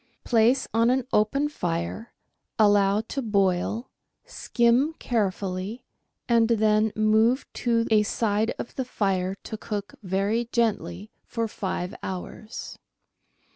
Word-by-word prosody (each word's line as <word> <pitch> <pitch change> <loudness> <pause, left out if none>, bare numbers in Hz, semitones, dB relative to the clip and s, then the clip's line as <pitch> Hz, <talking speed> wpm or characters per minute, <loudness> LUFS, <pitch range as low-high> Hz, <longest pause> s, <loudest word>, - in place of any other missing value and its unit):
Place 240 +3 +3
on 230 +1 +4
an 255 0 +1
open 275 +8 +2
fire, 175 - -3 0.5
allow 205 -1 +4
to 270 +5 -4
boil, 200 +1 0 0.3
skim 255 - +2
carefully, 200 -1 -2 0.4
and 230 -2 +4
then 215 -1 +3
move 220 +4 +3 0.2
to 230 -1 +2
a 215 -1 +6
side 210 +1 0
of - - -6
the 260 - 0
fire 190 -4 -1
to 220 - -6
cook 205 -2 -5
very 205 +5 -1
gently 205 -4 -1
for 230 -1 -2
FONDS - - -15
DE - - -18
CUISINE 190 -2 -1
ii 180 +3 -7
five - - -34
hours. 190 +4 -7
215 Hz, 135 wpm, -26 LUFS, 200-235 Hz, 0.5 s, a